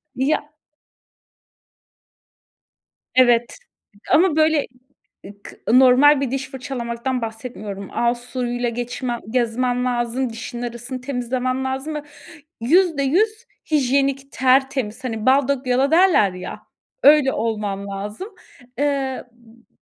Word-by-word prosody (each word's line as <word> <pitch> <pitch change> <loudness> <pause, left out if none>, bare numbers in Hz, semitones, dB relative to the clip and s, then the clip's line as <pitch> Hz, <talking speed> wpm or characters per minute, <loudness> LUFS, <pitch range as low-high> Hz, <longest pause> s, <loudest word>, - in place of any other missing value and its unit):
Ya 295 +3 -1 2.6
Evet 240 -2 +3 0.6
ama 320 +2 +4
böyle, 310 -2 +3 0.6
ı 200 +1 -13
k - - -11 0.2
normal 265 +3 +6
bir 260 -3 -2
diş 270 0 -3
fırçalamaktan 250 -1 -4
bahsetmiyorum. 220 -3 -6
Ağız 240 0 +1
suyuyla 245 0 -3
geçmem 240 +1 -4
gezmem 245 +1 0
lazım, 245 +1 -1
dişimin 230 +1 -7
arasını 240 +2 -6
temizlemem 255 0 -2
lazım 265 +4 -3
ve 300 - -4 0.6
%100 355 - +2 0.3
hijyenik, 275 -1 +1
tertemiz. 260 -3 +1
Hani, 225 -4 -4
bal 265 0 +4
dök 275 -2 -1
yala 260 +3 +2
derler 330 - +4
ya, 180 0 -8 0.4
öyle 290 -2 +6
olmam 210 -3 -3
lazım. 205 - -6 0.5
Eee, 275 -2 -1
b 235 0 -23
255 Hz, 105 wpm, -21 LUFS, 235-275 Hz, 2.6 s, normal